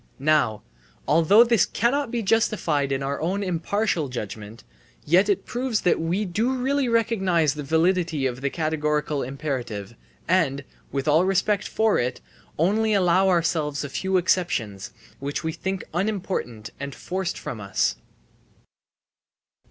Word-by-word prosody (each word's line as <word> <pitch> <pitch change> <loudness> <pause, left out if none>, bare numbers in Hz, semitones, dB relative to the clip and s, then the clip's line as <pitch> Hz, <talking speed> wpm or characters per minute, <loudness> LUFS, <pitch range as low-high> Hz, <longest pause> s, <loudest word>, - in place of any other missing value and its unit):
Now, 140 -7 +1 0.4
although 165 +9 +6
this 235 -5 +3
cannot 260 +3 0
be 235 -1 -2
justified 190 -10 +1
in 135 0 -1
our 140 +1 -3
own 190 +5 -1
impartial 180 -2 -1
judgement, 110 -2 -7 0.4
yet 185 +6 +4
it 200 - +1
proves 245 -2 -1
that 180 - +2
we 175 +6 -1
do 220 +8 0
really 265 +1 0
recognise 190 - +2
the 150 - -6
validity 160 0 +1
of 125 0 -2
the 140 - 0
categorical 150 -2 -1
imperative 125 -6 -4 0.3
and 155 -6 +1 0.3
(with 135 +1 -3
all 155 +3 +5
respect 195 +2 +1
for 220 -1 +2
it) 125 +1 -2 0.4
only 210 +6 +2
allow 185 0 +3
ourselves 165 -5 0
a 145 - -5
few 190 +6 0
exceptions, 150 - 0 0.3
which 140 +1 -4
we 160 - -1
think 190 +3 -4
unimportant 180 - -3
and 140 -1 -6
forced 185 0 -3
from 110 - -6
us. 95 -11 0
170 Hz, 135 wpm, -24 LUFS, 140-200 Hz, 0.4 s, although